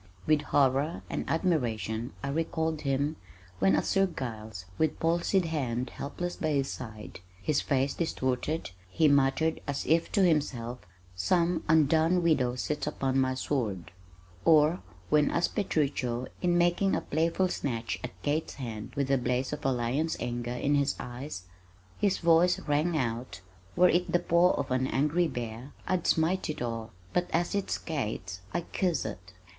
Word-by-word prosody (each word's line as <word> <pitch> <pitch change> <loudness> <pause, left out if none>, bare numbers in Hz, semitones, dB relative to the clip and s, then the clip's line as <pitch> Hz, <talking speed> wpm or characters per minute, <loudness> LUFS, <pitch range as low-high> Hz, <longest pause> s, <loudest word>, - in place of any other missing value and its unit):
_" - - -26 0.2
With 155 -1 +3
horror 140 +2 +1
and - - -3
admiration 120 - 0
I 140 - -2
recalled 160 +1 -1
him, 140 +2 0 0.4
when 95 +1 +4
as - - 0
Sir 195 0 +3
Giles, 110 - -6
with 160 - +1
palsied 170 +3 +2
hand 130 -6 -2
helpless 175 +5 -5
by 155 -4 0
his 135 -1 0
side, 110 -5 -8 0.2
his 145 +8 +1
face 135 -1 +1
distorted, 140 - -2 0.2
he 155 +11 +3
muttered 140 +3 +2
as 140 -1 -2
if 165 +1 +2
to 200 - +4
himself, 125 -8 0 0.4
"Some 170 - +1
undone 160 +3 +4
widow 130 -7 +2
sits 150 +4 -2
upon 135 0 0
my 130 0 +1
sword," 110 -10 -2 0.5
or 155 +2 +5 0.3
when 150 -1 +4
as 170 - +1
Petruchio 135 - -1 0.2
in 175 -1 +2
making 175 +3 +3
a - - -1
playful 165 +4 +1
snatch 115 -9 -3
at 125 - -7
Kate's 150 +2 -1
hand 115 -5 -6
with 140 -1 0
the 135 -1 +2
blaze 125 +1 -1
of - - -5
a 135 - +2
lion's 130 +6 0
anger 120 0 -3
in 140 +3 0
his 140 -1 +1
eye 125 +4 -6 0.7
his 200 -2 +2
voice 170 +1 +4
rang 155 +3 +1
out, 120 -6 -3 0.3
"Were 180 +1 +6
it 180 +1 +1
the - - +5
paw 175 +1 +3
of 135 - -3
an 130 +1 +1
angry 150 +6 +2
bear, 120 +1 -6
I'd 180 -2 0
smite 165 +3 +2
it 155 - -3
off 115 -2 -4 0.2
but 180 0 +1
as 170 +1 0
it's 200 -1 -1
Kate's 110 - -4
I 175 - -1
kiss 175 - -1
it." 95 -3 -7
145 Hz, 160 wpm, -29 LUFS, 125-165 Hz, 0.7 s, Were